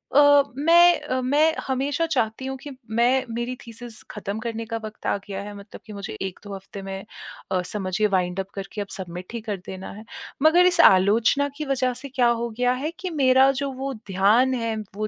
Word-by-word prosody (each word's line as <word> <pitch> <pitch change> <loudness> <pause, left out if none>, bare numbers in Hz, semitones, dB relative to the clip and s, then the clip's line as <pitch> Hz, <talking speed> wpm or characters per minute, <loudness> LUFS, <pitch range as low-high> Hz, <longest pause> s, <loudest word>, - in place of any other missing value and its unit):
अ, 285 0 +7
मैं 340 +3 +6
अ, 260 -3 -2
मैं 295 +5 +3
हमेशा 280 +5 0
चाहती 255 -4 -1
हूँ 265 - -3
कि 290 - -10 0.2
मैं 245 +4 +2
मेरी 240 +2 -3
थीसिस 230 0 -9
ख़त्म 210 0 -5
करने 230 0 -4
का 230 0 -4
वक़्त 215 0 -10
आ - - +2
गया 195 -1 -5
है। 205 0 -8
मतलब 200 +1 -12
कि 215 - -10
मुझे 200 - -6
1-2 195 +1 -6
हफ्ते 195 +1 -9
में 195 0 -7 0.5
अ, 185 - +1
समझिए 195 +2 -1
वाइंड 180 -2 0
अप 190 - -3
करके 195 +1 -5
अब 200 - -5
सबमिट 180 +1 -8
ही 235 - -4
कर 210 -2 -4
देना 190 0 -7
है। 215 +2 -10 0.4
मगर 345 +3 +6
इस 355 - +2
आलोचना 220 +9 +5
की 305 - -4
वजह 255 -2 0
से 280 - -8
क्या 250 -2 +2
हो 235 0 -1
गया 250 0 +3
है 310 - -1
कि 370 - -4
मेरा 265 -3 +5
जो 280 -1 -2
वो 270 +1 -4
ध्यान 205 +7 +3
है, 230 -3 -1 0.2
वो 215 +1 -2
230 Hz, 205 wpm, -24 LUFS, 200-270 Hz, 0.5 s, अ